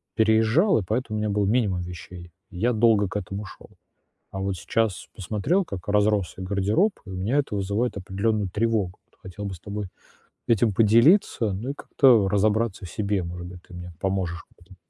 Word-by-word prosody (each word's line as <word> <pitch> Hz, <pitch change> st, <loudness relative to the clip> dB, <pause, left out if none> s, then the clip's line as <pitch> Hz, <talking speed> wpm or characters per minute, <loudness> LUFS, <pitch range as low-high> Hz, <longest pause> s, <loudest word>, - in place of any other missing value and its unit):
переезжал, 110 Hz, -, +3 dB
и -, -, -3 dB
поэтому 110 Hz, +1 st, -2 dB
у -, -, -1 dB
меня 105 Hz, 0 st, -1 dB
был 100 Hz, 0 st, +1 dB
минимум 100 Hz, -5 st, +1 dB
вещей, 90 Hz, 0 st, -9 dB, 0.2 s
и 90 Hz, -, -11 dB
я 120 Hz, +6 st, +2 dB
долго 110 Hz, -3 st, +3 dB
к 105 Hz, -, -3 dB
этому 100 Hz, +1 st, -5 dB
шёл. -, -, -13 dB, 0.6 s
А 95 Hz, -, -4 dB
вот 95 Hz, -1 st, -2 dB
сейчас 110 Hz, +2 st, -1 dB
посмотрел, 110 Hz, -, 0 dB
как 95 Hz, -, -8 dB
разросся 105 Hz, -2 st, +1 dB
гардероб, 100 Hz, -, +1 dB
и -, -, -9 dB
у -, -, -6 dB
меня 105 Hz, +10 st, 0 dB
это 135 Hz, -7 st, -1 dB
вызывает 100 Hz, +4 st, -1 dB
определенную 100 Hz, +1 st, -1 dB
тревогу. 105 Hz, -3 st, -1 dB
Вот -, -, -35 dB
хотел 95 Hz, +2 st, -8 dB
бы 95 Hz, -2 st, -4 dB
с 85 Hz, -, -14 dB
тобой 105 Hz, -1 st, -5 dB, 0.6 s
этим 110 Hz, -2 st, +3 dB
поделиться, 115 Hz, -, +4 dB
ну, 115 Hz, +8 st, -4 dB
и -, -, -6 dB
как-то 120 Hz, -8 st, +4 dB
разобраться 105 Hz, 0 st, +1 dB
в -, -, -9 dB
себе. 100 Hz, -3 st, -1 dB
Может 85 Hz, +1 st, -6 dB
быть, 90 Hz, -1 st, -11 dB
ты -, -, -17 dB
мне 90 Hz, -1 st, -8 dB
поможешь 95 Hz, -3 st, -2 dB
в -, -, -29 dB
этом. 95 Hz, +1 st, -17 dB
105 Hz, 195 wpm, -25 LUFS, 95-110 Hz, 0.6 s, поделиться